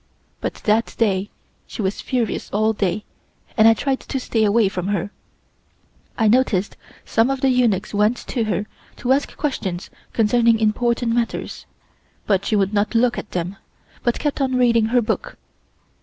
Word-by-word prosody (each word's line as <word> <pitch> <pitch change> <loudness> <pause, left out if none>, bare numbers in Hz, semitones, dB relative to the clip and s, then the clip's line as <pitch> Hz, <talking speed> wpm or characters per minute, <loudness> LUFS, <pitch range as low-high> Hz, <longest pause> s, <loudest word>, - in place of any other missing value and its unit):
But - - -3
that 220 +2 +1
day 200 -3 +1 0.4
she 220 - -5
was 190 +1 -2
furious 240 -5 -2
all 215 +2 +1
day 205 0 -1 0.5
and 220 -1 +6
I 225 - +6
tried 270 +3 -1
to 270 - -4
stay 225 -3 0
away 215 0 +4
from 185 -2 -3
her. 200 0 -1 1.1
I 225 - +3
noticed 210 -4 +2 0.3
some 225 +3 +2
of 270 -1 -2
the 270 - +3
eunuchs 235 -7 +1
went 210 +4 +2
to 235 -4 -1
her 205 -1 -1 0.3
to 245 - -2
ask 280 +1 -2
questions 195 - -3 0.2
concerning 230 +1 +3
important 235 +2 +1
matters, 235 -1 -3 0.6
but 195 -2 +1
she 220 - +1
would 200 0 +1
not 210 +3 0
look 240 +1 +3
at - - -9
them, 180 +2 -3 0.4
but 240 - 0
kept 295 -1 -2
on 260 -1 +1
reading 235 -3 +4
her 240 +2 +2
book. - - -3
225 Hz, 165 wpm, -21 LUFS, 205-245 Hz, 1.1 s, and